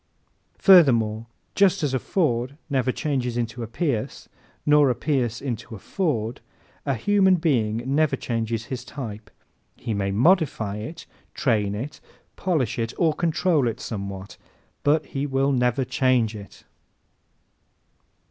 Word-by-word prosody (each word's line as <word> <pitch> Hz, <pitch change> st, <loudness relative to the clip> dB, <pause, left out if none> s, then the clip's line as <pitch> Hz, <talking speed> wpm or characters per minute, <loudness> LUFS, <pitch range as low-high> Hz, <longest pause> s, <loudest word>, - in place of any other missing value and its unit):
Furthermore 115 Hz, -, +5 dB, 0.3 s
just 195 Hz, -5 st, +3 dB
as 140 Hz, -3 st, 0 dB
a 130 Hz, -, +1 dB
Ford 135 Hz, -6 st, -1 dB
never 130 Hz, -2 st, +1 dB
changes 125 Hz, -4 st, -2 dB
into 120 Hz, 0 st, -3 dB
a 115 Hz, -, -4 dB
Pierce 115 Hz, -1 st, -3 dB, 0.4 s
nor 150 Hz, -2 st, +5 dB
a 125 Hz, -, +1 dB
Pierce 125 Hz, -4 st, -1 dB
into 120 Hz, -3 st, -5 dB
a -, -, -8 dB
Ford, 120 Hz, -, -2 dB, 0.5 s
a 135 Hz, -, +1 dB
human 190 Hz, -, +3 dB
being 120 Hz, -9 st, 0 dB
never 145 Hz, +3 st, +2 dB
changes 115 Hz, -1 st, -3 dB
his 130 Hz, 0 st, -5 dB
type. 110 Hz, -6 st, -7 dB, 0.5 s
He 115 Hz, -, -4 dB
may 100 Hz, -1 st, -1 dB
modify 115 Hz, -, +2 dB
it, 120 Hz, +11 st, -7 dB, 0.3 s
train 105 Hz, -5 st, +1 dB
it, 135 Hz, +8 st, -6 dB, 0.4 s
polish 155 Hz, -, -1 dB
it 115 Hz, +1 st, -2 dB
or 165 Hz, -3 st, +3 dB
control 165 Hz, -3 st, +1 dB
it 115 Hz, -, -3 dB
somewhat, 100 Hz, -3 st, -6 dB, 0.4 s
but 150 Hz, +2 st, +2 dB
he 140 Hz, 0 st, -3 dB
will 135 Hz, 0 st, +1 dB
never 125 Hz, 0 st, +1 dB
change 125 Hz, -4 st, +1 dB
it. 100 Hz, -1 st, -11 dB
125 Hz, 135 wpm, -24 LUFS, 110-150 Hz, 0.5 s, Furthermore